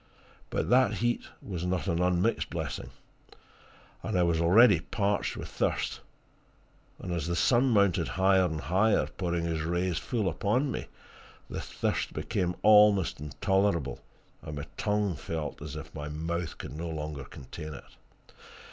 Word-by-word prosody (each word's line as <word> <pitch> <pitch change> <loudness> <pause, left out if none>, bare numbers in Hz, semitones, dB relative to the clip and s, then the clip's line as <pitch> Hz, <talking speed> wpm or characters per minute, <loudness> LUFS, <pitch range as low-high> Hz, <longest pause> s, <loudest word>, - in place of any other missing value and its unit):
But - - -1
that 130 +1 +5
heat 120 0 0 0.2
was 90 -4 -5
not 90 0 -1
an 85 -3 0
unmixed 90 +5 +1
blessing - - -4 1.1
and 110 -4 -2
I 90 - +4
was 85 -1 +2
already 100 +3 +6
parched 100 +3 -1
with - - -6
thirst; - - -1 1.0
and 90 - -5
as 85 -2 -2
the 85 - -1
sun 125 +8 +3
mounted 100 -7 +3
higher 95 0 +3
and 80 -3 -2
higher, 95 +9 +2
pouring 85 -3 -2
his 80 -1 -1
rays 85 +2 0
full 110 -6 -1
upon 105 - 0
me, - - -4 0.6
the - - -3
thirst - - -2
became 90 -1 -1
almost 105 -5 +6
intolerable, 85 -1 0 0.4
and 75 - -7
my 70 +1 -5
tongue 105 -3 0
felt 75 -1 -5
as 75 0 -6
if 80 0 -8
my 75 -1 -5
mouth 80 +2 -3
could - - -7
no 85 +2 -4
longer 75 -3 -5
contain 75 +4 -9
it. - - -18
90 Hz, 150 wpm, -29 LUFS, 80-100 Hz, 1.1 s, already